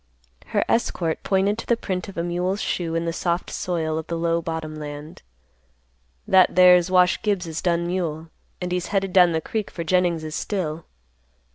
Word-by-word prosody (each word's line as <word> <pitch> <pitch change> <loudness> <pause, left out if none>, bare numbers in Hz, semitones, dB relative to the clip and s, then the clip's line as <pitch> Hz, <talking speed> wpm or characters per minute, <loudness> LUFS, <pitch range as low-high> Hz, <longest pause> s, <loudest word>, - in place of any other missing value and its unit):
Her - - 0
escort 170 -8 0
pointed 200 +3 +1
to - - -7
the 235 - +2
print 185 -2 -4
of 195 - -11
a 170 - -1
mule's 180 +3 -1
shoe 170 -5 -2
in 165 0 -1
the 165 - -2
soft 170 +1 -2
soil 160 -3 -2
of 160 - -8
the 170 - -3
low 170 0 0
bottom 160 -1 -5
land. 150 +1 -8 1.1
"That 185 -1 +5
there's 180 -1 +6
Wash 180 0 +3
Gibbs's 180 -6 -2
dun 170 -1 +1
mule, 165 -3 -3 0.3
and 180 -1 -4
he's 180 0 -1
headed 195 -2 -1
down 180 -2 +6
the 160 - 0
creek 215 +4 -3
for 170 - -5
Jennings's 165 -2 0
still. 165 -6 -3
175 Hz, 175 wpm, -23 LUFS, 165-185 Hz, 1.1 s, there's